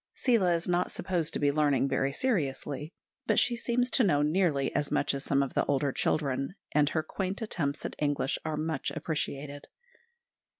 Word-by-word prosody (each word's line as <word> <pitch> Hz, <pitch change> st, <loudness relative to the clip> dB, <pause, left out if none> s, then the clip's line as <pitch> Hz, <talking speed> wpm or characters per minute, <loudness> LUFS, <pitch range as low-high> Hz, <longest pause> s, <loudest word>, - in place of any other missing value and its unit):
Seela 205 Hz, -9 st, +3 dB
is 170 Hz, -, -2 dB
not 180 Hz, 0 st, +1 dB
supposed 170 Hz, -4 st, -1 dB
to -, -, 0 dB
be 145 Hz, -1 st, +2 dB
learning 140 Hz, -3 st, +2 dB
very 135 Hz, 0 st, 0 dB
seriously; 150 Hz, -, -2 dB, 0.4 s
but -, -, +2 dB
she 240 Hz, -, +4 dB
seems 240 Hz, +1 st, 0 dB
to 255 Hz, -, +4 dB
know 145 Hz, -8 st, +3 dB
nearly 150 Hz, -3 st, +1 dB
as 145 Hz, 0 st, 0 dB
much 140 Hz, -, +1 dB
as 140 Hz, 0 st, -3 dB
some 140 Hz, 0 st, +2 dB
of 135 Hz, -, -5 dB
the -, -, +2 dB
older 140 Hz, 0 st, +1 dB
children, 135 Hz, +2 st, -1 dB, 0.2 s
and 145 Hz, -1 st, +3 dB
her 155 Hz, -1 st, -1 dB
quaint 190 Hz, +4 st, -3 dB
attempts 150 Hz, -9 st, -2 dB
at -, -, -4 dB
English 145 Hz, -2 st, 0 dB
are 155 Hz, -1 st, -2 dB
much 155 Hz, -2 st, -2 dB
appreciated. 145 Hz, -2 st, -4 dB
150 Hz, 180 wpm, -29 LUFS, 140-180 Hz, 0.4 s, she